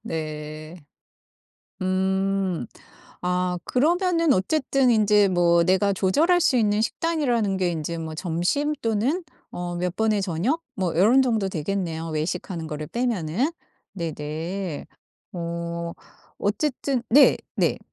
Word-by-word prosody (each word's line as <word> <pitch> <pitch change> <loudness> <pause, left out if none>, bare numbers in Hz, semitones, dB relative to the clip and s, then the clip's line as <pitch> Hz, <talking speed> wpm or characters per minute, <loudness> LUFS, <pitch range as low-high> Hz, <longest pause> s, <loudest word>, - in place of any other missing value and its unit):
네. 155 -2 -6 1.0
음. 190 -4 0 0.6
아 180 0 0
그러면은 335 +3 +2
어쨌든 265 +5 +2
인제 210 -2 +4
뭐 170 -2 +4
내가 190 +3 +3
조절할 295 - +3
수 270 - +3
있는 210 -2 +2
식단이라는 240 -6 0
게 185 -2 +1
인제 165 0 -3
뭐 160 -1 -5
점심 180 - 0
또는 230 - 0 0.3
어 175 0 -4
몇 180 +1 -2
번의 220 -2 +2
저녁 195 - -1
뭐 185 -6 -1
이런 225 +10 +5
정도 225 -6 +1
되겠네요, 165 -1 -3
외식하는 165 +2 -3
거를 150 -1 -5
빼면은. 235 - -1 0.4
네네. 165 0 -4 0.5
어 170 -1 -4 0.5
어쨌든 260 +4 -1
네네. 280 +4 +3
190 Hz, 220 characters per minute, -24 LUFS, 170-235 Hz, 1.0 s, 이런